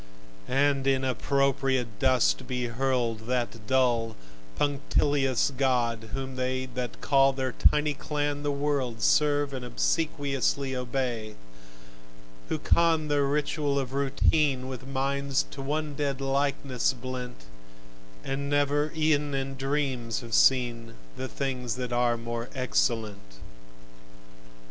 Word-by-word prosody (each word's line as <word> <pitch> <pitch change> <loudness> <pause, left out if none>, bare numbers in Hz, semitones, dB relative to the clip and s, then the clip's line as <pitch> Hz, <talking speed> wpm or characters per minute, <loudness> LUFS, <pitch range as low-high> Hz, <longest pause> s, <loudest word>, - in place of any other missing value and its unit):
And 135 0 +2
in 135 -1 +2
appropriate 130 -2 0
dust 130 0 +2
be 125 -1 -2
hurled 120 -2 -1
That 120 -3 -2
dull, 120 -4 +2 0.4
punctilious 140 -2 +1
god, 120 -4 0
whom 135 -1 -5
they 130 0 -1
That 125 -1 -5
call 135 -1 +4
their 130 -1 -2
tiny 150 +4 +3
clan 145 -1 -2
the 145 - -1
world, 140 -6 -1
Serve 145 -1 +3
and 130 -2 -4
obsequiously 140 -1 0
obey: 125 -4 -3 1.1
Who - - 0
con 160 -2 +2
their 145 -1 +2
ritual 145 0 0
of 135 -1 -2
Routine, 140 -1 +1
With 130 0 -7
minds 140 0 0
to 140 - -7
one 150 +2 -2
dead 140 -1 -2
likeness 135 -2 0
blent, 125 - -6 0.8
And 140 +1 -3
never 145 0 +2
ev'n 150 -2 +1
in 135 0 -3
dreams 135 -4 -1
have 115 -2 -9
seen 120 -3 +3 0.2
The 130 - -4
things 130 -4 -3
that 125 -1 -4
are 120 -1 +2
more 115 +1 -5
excellent. 110 - -1
135 Hz, 120 wpm, -28 LUFS, 125-140 Hz, 1.1 s, call